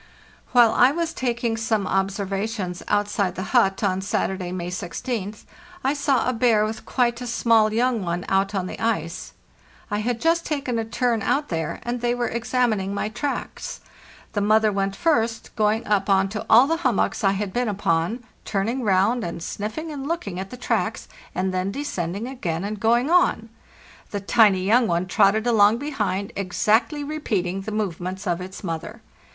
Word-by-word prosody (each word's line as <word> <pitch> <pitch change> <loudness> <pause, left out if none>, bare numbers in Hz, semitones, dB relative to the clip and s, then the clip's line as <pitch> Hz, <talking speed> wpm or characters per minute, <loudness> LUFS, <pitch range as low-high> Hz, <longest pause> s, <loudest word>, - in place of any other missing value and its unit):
While 240 -3 +6
I 255 - +5
was 330 +1 -2
taking 235 -2 -1
some 220 -2 0
observations 195 0 -2
outside 205 -2 0
the 185 - -3
hut 205 -5 +3
on 190 -1 +1
Saturday, 190 -2 -2
May 180 -1 -4
16th, 205 +3 -4 0.4
I 270 - +2
saw 280 -5 +1
a 255 - +1
bear 225 -3 +3
with 220 +1 -6
quite 240 -1 +1
a 245 - -4
small 230 -2 +3
young 235 -1 +1
one 175 0 -2
out 195 +1 +1
on 190 -2 -1
the - - -7
ice. 200 -7 -2 0.6
I 205 - 0
had 235 +2 -1
just 335 +3 +2
taken 275 -7 -2
a 225 - -2
turn 235 0 0
out 290 +8 0
there, 165 -2 -3
and 240 0 -3
they 240 0 +1
were 245 -1 -1
examining 230 -4 0
my 210 - -1
tracks. 255 +6 -4 0.5
The 205 - 0
mother 215 +1 +4
went 195 0 -1
first, 230 -5 0
going 220 0 +1
up 205 -1 +1
on 195 0 +3
to 210 +1 -5
all 235 +4 +8
the 325 +3 0
hummocks 255 - 0
I 195 -1 +4
had 200 -1 -3
been 245 -2 0
upon, 195 +3 0 0.2
turning 225 +6 -1
round 210 +4 +2
and 170 -1 -5
sniffing 220 - -4
and 280 -2 -5
looking 210 - -3
at 190 0 -5
the 250 - -9
tracks, - - -1 0.3
and 185 0 -1
then 185 +1 -1
descending 200 - -3
again 180 -10 -3
and 210 +1 -4
going 235 +7 +2
on. 345 -11 +3 0.6
The 205 - -3
tiny 200 -2 +4
young 230 +4 +4
one 175 +1 0
trotted 200 +4 +3
along 220 -2 +5
behind, 210 -9 -2
exactly 220 - +1
repeating 205 -12 -2
the 215 +3 -6
movements 190 -2 -3
of 175 -1 -1
its 185 +2 -8
mother. 190 +6 -5
215 Hz, 175 wpm, -23 LUFS, 195-240 Hz, 0.6 s, all